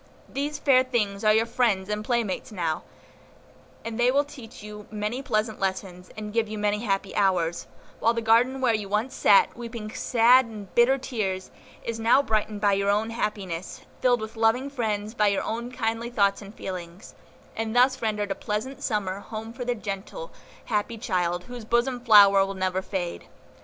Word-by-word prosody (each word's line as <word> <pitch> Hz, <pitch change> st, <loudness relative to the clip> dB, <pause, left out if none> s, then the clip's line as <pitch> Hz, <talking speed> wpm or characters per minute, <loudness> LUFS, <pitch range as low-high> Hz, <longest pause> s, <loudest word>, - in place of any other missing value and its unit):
These 290 Hz, +2 st, -3 dB
fair 260 Hz, -3 st, +4 dB
things 210 Hz, -6 st, -1 dB
are 215 Hz, -, +5 dB
your 220 Hz, +1 st, +3 dB
friends 230 Hz, -5 st, +1 dB
and 210 Hz, 0 st, -2 dB
playmates 230 Hz, -3 st, -1 dB
now, 170 Hz, -6 st, -2 dB, 1.0 s
and 230 Hz, 0 st, -5 dB
they 240 Hz, +1 st, +4 dB
will 280 Hz, +3 st, +3 dB
teach 255 Hz, -7 st, -12 dB
you 210 Hz, 0 st, -9 dB
many 215 Hz, +4 st, -3 dB
pleasant 215 Hz, -3 st, -1 dB
lessons, 185 Hz, -2 st, -3 dB
and 210 Hz, -1 st, -6 dB
give 230 Hz, -1 st, +1 dB
you 215 Hz, 0 st, -6 dB
many 210 Hz, 0 st, 0 dB
happy 195 Hz, -3 st, -2 dB
hours; 175 Hz, -4 st, +1 dB, 0.3 s
while 230 Hz, +1 st, +2 dB
the -, -, 0 dB
garden 245 Hz, +4 st, +3 dB
where 245 Hz, -3 st, +3 dB
you 210 Hz, -2 st, -2 dB
once 215 Hz, +6 st, -1 dB
sat, 480 Hz, -2 st, +4 dB
weeping 230 Hz, -2 st, -7 dB
sad 245 Hz, +3 st, +4 dB
and 210 Hz, -4 st, -10 dB
bitter 240 Hz, +3 st, +4 dB
tears, 200 Hz, -8 st, -3 dB, 0.3 s
is 230 Hz, -1 st, -4 dB
now 235 Hz, +5 st, +4 dB
brightened 215 Hz, -3 st, -1 dB
by 205 Hz, -1 st, +3 dB
your 200 Hz, 0 st, +1 dB
own 215 Hz, +3 st, +1 dB
happiness, 195 Hz, -6 st, -4 dB, 0.2 s
filled 245 Hz, -2 st, +3 dB
with 220 Hz, +1 st, -7 dB
loving 230 Hz, +5 st, +1 dB
friends 215 Hz, -5 st, -2 dB
by 210 Hz, -3 st, +2 dB
your 200 Hz, -1 st, +1 dB
own 235 Hz, +2 st, -4 dB
kindly 230 Hz, -1 st, -2 dB
thoughts 200 Hz, -4 st, +1 dB
and 200 Hz, +2 st, -11 dB
feelings; 180 Hz, -1 st, -7 dB, 0.4 s
and 225 Hz, 0 st, -3 dB
thus 255 Hz, +1 st, +4 dB
rendered 210 Hz, -2 st, -1 dB
a -, -, +2 dB
pleasant 210 Hz, +7 st, -4 dB
summer 200 Hz, -4 st, -1 dB
home 220 Hz, +2 st, -7 dB
for 245 Hz, +1 st, -5 dB
the 245 Hz, 0 st, -1 dB
gentle, 215 Hz, -, -6 dB, 0.3 s
happy 220 Hz, 0 st, -1 dB
child, 180 Hz, -5 st, -1 dB
whose 245 Hz, +3 st, -9 dB
bosom 240 Hz, +3 st, +1 dB
flower 200 Hz, -4 st, +7 dB
will 195 Hz, 0 st, -4 dB
never 185 Hz, 0 st, -1 dB
fade. 185 Hz, -3 st, -4 dB
215 Hz, 180 wpm, -26 LUFS, 200-240 Hz, 1.0 s, flower